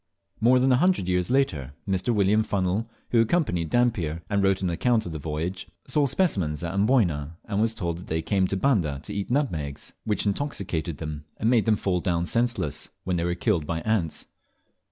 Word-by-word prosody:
More 125 +3 +5
than 130 +1 +3
a 125 - +5
hundred 180 - +2
years 90 -1 +1
later 80 - 0
Mr. 95 +4 +1
William 105 0 +3
Funnel, 100 +2 -1 0.2
who 115 - +5
accompanied 115 - +1
Dampier, 90 -10 +1
and 100 -1 +2
wrote 95 0 +2
an 90 - +1
account 115 +6 +1
of 85 - -5
the 80 - -5
voyage, 80 +5 -4 0.2
saw 145 -2 +2
specimens 95 - 0
at 85 - -3
Amboyna, 95 - +1
and 105 -1 -1
was 115 0 +1
told 85 -4 -3
that 90 - -11
they 80 +1 -1
came 95 -2 +1
to 95 - -1
Banda 95 - +1
to 105 - -6
eat 100 -1 -3
nutmegs, 80 - -2
which 105 -1 -1
intoxicated 100 - -2
them 75 -2 -6
and 110 +2 +1
made 115 -4 +3
them 110 - +5
fall 95 -3 0
down 85 -2 0
senseless, 115 -9 0
when 90 -1 -1
they 85 - 0
were 85 0 0
killed 90 -8 0
by 80 -1 -2
ants. 105 -7 -1
95 Hz, 195 wpm, -26 LUFS, 85-115 Hz, 0.2 s, More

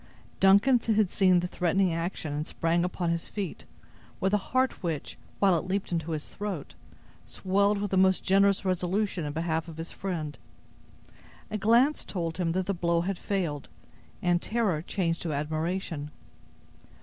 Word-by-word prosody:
Duncan 200 +7 +6
had 215 -4 +1
seen 185 -2 +4
the 180 - -2
threatening 180 +1 +1
action, 165 -2 -3
and 150 +2 -3
sprang 165 +1 0
upon 180 -1 -1
his 170 0 -2
feet, 200 -5 -5 0.5
with 190 +2 0
a - - +6
heart 260 +1 +1
which, 165 -6 -3 0.2
while 195 -3 +4
it 180 - -7
leaped 195 0 -2
into 165 -1 -1
his 155 -1 -4
throat, 200 -8 -5 0.5
swelled 200 +2 +1
with 205 -1 -3
the 190 - +2
most 190 0 +4
generous 195 +1 +3
resolution 185 0 0
in 145 - -3
behalf 160 +1 -1
of 165 -1 -9
his 165 +1 -6
friend. 165 -6 -4 1.1
A 215 - -1
glance 235 +8 +4
told 170 -2 -4
him 165 -2 +1
that 185 +1 0
the 200 - 0
blow 170 -1 +1
had 190 +1 -2
failed, 170 -8 -2 0.5
and 175 -1 +2
terror 215 -9 0
changed 170 -1 -1
to 165 -3 -2
admiration. 155 +1 -2
180 Hz, 160 wpm, -28 LUFS, 165-195 Hz, 1.1 s, Duncan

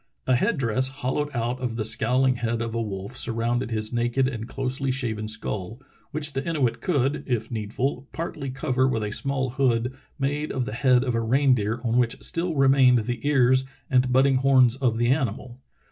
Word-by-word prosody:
A 130 - +3
head 175 - +1
dress 130 0 +1
hollowed 135 +2 -3
out 120 -1 -2
of 125 -3 -3
the 110 -2 -2
scowling 125 +4 +3
head 115 -1 -2
of 115 -1 -3
a 115 - -1
wolf 100 +1 -6
surrounded 120 0 -1
his 110 0 -2
naked 120 +2 +1
and 115 -4 -5
closely 135 +1 -2
shaven 115 -5 -2
skull, 110 0 -2 0.3
which 150 -1 -1
the 135 +1 -2
Inuit 150 -8 -1
could, 145 -6 0
if 115 -3 -2
needful, 120 +5 -3
partly 155 -4 -5
cover 130 0 0
with 115 -4 -1
a 105 - -3
small 135 +1 -1
hood 125 -2 0 0.2
made 145 +2 -2
of 130 -2 -2
the 105 - -5
head 125 +1 +3
of 125 -2 -1
a 115 - 0
reindeer 120 -2 +2
on 120 0 +1
which 115 -2 0
still 170 0 0
remained 135 -3 +4
the 120 +1 -3
ears 130 -2 +4 0.3
and 125 -1 +3
budding 130 +1 +4
horns 130 -2 +4
of 125 -4 0
the 120 +1 +1
animal." 130 -2 -2
125 Hz, 190 wpm, -24 LUFS, 115-135 Hz, 0.3 s, remained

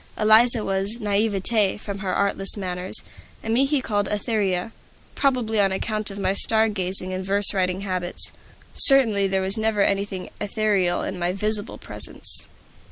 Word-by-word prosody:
Eliza 220 +2 +4
was 195 +3 -1
"Naivete," 205 -1 +1
from 200 -1 -7
her 190 -1 -3
artless 200 0 +1
manners; 180 -1 -2 0.4
and 225 - -2
me 260 +4 +3
he 280 -1 0
called 205 -4 -1
"Etheria," 210 -2 -1 0.4
probably 245 -6 0
on 195 -1 +2
account 215 +2 -3
of 195 - -9
my 190 -1 0
star 220 +2 +3
gazing 185 -2 -3
and 185 0 -4
verse 200 +2 +2
writing 185 -1 -1
habits. 185 -3 0 0.4
Certainly 225 -8 +4
there 190 0 0
was 190 +3 +3
never 215 -2 +1
anything 200 -2 -2
ethereal 205 -4 0
in 190 - -5
my 175 0 0
visible 210 +2 -2
presence. - - -2
200 Hz, 155 wpm, -23 LUFS, 190-220 Hz, 0.4 s, Eliza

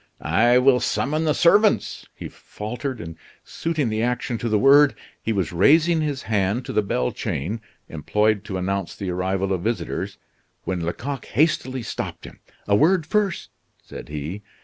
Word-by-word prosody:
"I 120 +10 +4
will 125 0 +5
summon 155 +6 -1
the 150 - +2
servants," 205 +5 +3
he - - -7
faltered, 120 +4 -6
and 80 -1 -8 0.3
suiting 155 -7 -2
the 110 0 -1
action 120 -1 -1
to 115 - -2
the 110 - +2
word, 140 +4 +6 0.3
he 115 - -2
was 95 -6 -1
raising 160 - +4
his 145 -4 -2
hand 105 +3 0
to - - -5
the - - +3
bell 65 -11 -1
chain, 100 +12 -4 0.3
employed 105 +6 0
to 95 - -4
announce 95 0 -2
the 95 -2 -4
arrival 95 +2 -1
of 90 - -2
visitors, 115 +4 -3 0.5
when 95 -2 -2
Lecoq 125 +10 -4
hastily 130 -3 0
stopped - - -5
him. - - -12 0.3
"A 100 - +4
word 165 - +3
first!" 200 +1 -1 0.3
said - - -10
he. 75 +7 -5
115 Hz, 165 wpm, -23 LUFS, 95-145 Hz, 0.5 s, word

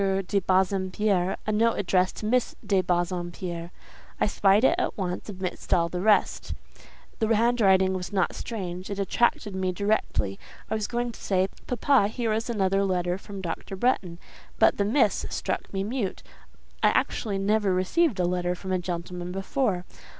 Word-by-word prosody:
de 200 - +2
Bassompierre, 190 0 +1
a 215 - 0
note 225 +2 +2
addressed 185 -1 +1
to - - -6
Miss 250 +3 +1
de 195 -2 +3
Bassompierre. 175 -1 -2 0.5
I - - +3
spied 205 +1 +3
it - - +6
at - - -1
once, 180 0 -3
amidst 185 -2 -5
all 170 -1 +1
the 180 +1 -3
rest; 210 +1 +2 0.6
the 220 - +1
handwriting 200 -5 +4
was 185 +1 -4
not 190 -3 +1
strange; 185 -5 -5
it 200 - -4
attracted 210 +1 +1
me 185 -1 -1
directly. 180 - -1 0.3
I - - +2
was 215 -2 -1
going 240 0 -2
to - - -14
say, 190 -1 +1 0.2
'Papa, 250 -2 +3
here 225 0 -1
is 225 +2 -2
another 195 -3 +1
letter 180 -1 0
from 200 -1 -8
Dr. 185 +2 -5
Bretton;' 190 -6 0 0.4
but - - +4
the 200 - +1
'Miss' 220 0 +2
struck - - -3
me 195 -1 -2
mute. 215 -3 -3 0.6
I - - +5
actually 205 -4 0
never 205 0 +2
received 200 - +1
a 180 - +2
letter 180 0 0
from 190 +1 -6
a 185 - +1
gentleman 175 0 -5
before. 195 0 -1
195 Hz, 165 wpm, -26 LUFS, 180-215 Hz, 0.6 s, it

